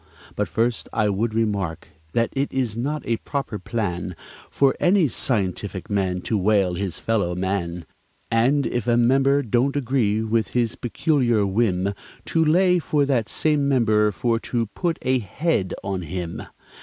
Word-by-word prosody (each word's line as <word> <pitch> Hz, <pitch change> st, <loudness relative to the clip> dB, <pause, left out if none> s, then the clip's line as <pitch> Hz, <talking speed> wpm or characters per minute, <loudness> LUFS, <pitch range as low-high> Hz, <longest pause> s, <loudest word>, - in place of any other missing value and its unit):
But -, -, -1 dB
first 115 Hz, 0 st, -1 dB
I 105 Hz, -2 st, +1 dB
would 110 Hz, +3 st, -1 dB
remark, 100 Hz, -8 st, -1 dB, 0.2 s
that 115 Hz, 0 st, +2 dB
it 140 Hz, +1 st, -1 dB
is 125 Hz, -5 st, -1 dB
not 140 Hz, +5 st, -2 dB
a 115 Hz, -, 0 dB
proper 135 Hz, -7 st, -4 dB
plan 90 Hz, -4 st, -3 dB, 0.3 s
For 135 Hz, -1 st, +2 dB
any 180 Hz, -3 st, +4 dB
scientific 100 Hz, -6 st, -2 dB
man 95 Hz, -3 st, 0 dB
to 110 Hz, +2 st, -1 dB
whale 95 Hz, -2 st, +2 dB
his 95 Hz, -1 st, -3 dB
fellow 100 Hz, -6 st, 0 dB
man, 90 Hz, -2 st, -2 dB, 0.5 s
And, 130 Hz, +5 st, +3 dB
if 120 Hz, -2 st, -2 dB
a 120 Hz, -1 st, +3 dB
member 135 Hz, +4 st, +3 dB
don't 125 Hz, +4 st, +1 dB
agree 120 Hz, -6 st, +1 dB
with 110 Hz, -2 st, +1 dB
his 120 Hz, -2 st, +1 dB
peculiar 120 Hz, -4 st, +1 dB
whim, 100 Hz, -1 st, +1 dB, 0.3 s
To 165 Hz, -, +2 dB
lay 180 Hz, +3 st, +4 dB
for 150 Hz, -3 st, +1 dB
that 120 Hz, -6 st, 0 dB
same 150 Hz, -2 st, +1 dB
member 110 Hz, -5 st, +3 dB
for 115 Hz, +6 st, 0 dB
to 115 Hz, 0 st, -1 dB
"put 170 Hz, -3 st, -1 dB
a 130 Hz, 0 st, +2 dB
head" 115 Hz, -, -1 dB
on 95 Hz, -1 st, -2 dB
him. 85 Hz, 0 st, -5 dB
115 Hz, 155 wpm, -23 LUFS, 100-135 Hz, 0.5 s, any